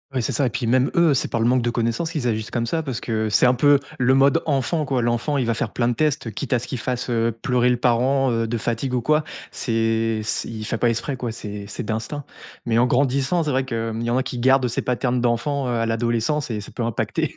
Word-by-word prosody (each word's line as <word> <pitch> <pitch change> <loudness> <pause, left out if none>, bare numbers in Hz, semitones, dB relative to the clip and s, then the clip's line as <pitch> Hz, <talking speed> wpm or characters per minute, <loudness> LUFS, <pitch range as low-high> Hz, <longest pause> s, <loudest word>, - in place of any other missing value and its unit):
Ouais 125 - +1
c'est - - -1
ça 140 - +1
et - - +1
puis 120 +1 -3
même 130 +2 +3
eux, 170 -4 +5
c'est 130 - 0
par 115 - -2
le 115 - +3
manque 125 0 +3
de 120 - 0
connaissances 115 +8 -1
qu'ils 125 -6 -1
agissent 110 -1 -2
comme 115 -1 -1
ça 160 +7 -1
parce 135 -6 -4
que 110 -2 -1
c'est 105 - +4
un 125 - +5
peu 145 +3 +5 0.2
le 125 +1 +4
mode 135 0 +4
enfant 145 +2 0
quoi, 130 -4 0
l'enfant 120 +5 0
il 130 - +1
va 115 - +1
faire - - -3
plein 120 -1 +1
de - - +1
tests 150 -6 0
quitte 130 - -3
à 125 - +3
ce 120 - -8
qu'il 130 - -4
fasse, 125 +1 -3
heu, 115 -1 0
pleurer 125 -1 +2
le 125 - +3
parent, 130 +2 +2
heu, 115 -1 0
de 120 - -2
fatigue 115 +3 -2
ou 125 - +1
quoi. 150 +4 +2 0.3
C'est 115 -1 0
c 110 - -2
il 110 -2 -6
fait 115 - -2
pas 120 - +2
exprès 125 +4 -2
quoi, 120 -2 -4
c'est 105 -3 -7
c'est 110 +4 -5
d'instinct 115 +7 -4 0.4
mais 115 -1 +1
en 120 +2 +4
grandissant, 140 +6 +1
c'est 150 - -2
vrai 130 0 +1
qu'il 115 -2 -3
y 115 - -2
en 120 - +1
a 130 - +1
qui 125 -1 -5
gardent 130 0 +3
ces 120 - -1
paternes 125 0 0
d'enfants, 125 +3 0
heu, - - -1
à 115 -1 0
l'adolescence 120 +5 0
et 105 -2 -3
ça 100 - -10
peut 120 - -4
impacter 115 -2 -2
120 Hz, 270 wpm, -22 LUFS, 115-135 Hz, 0.4 s, eux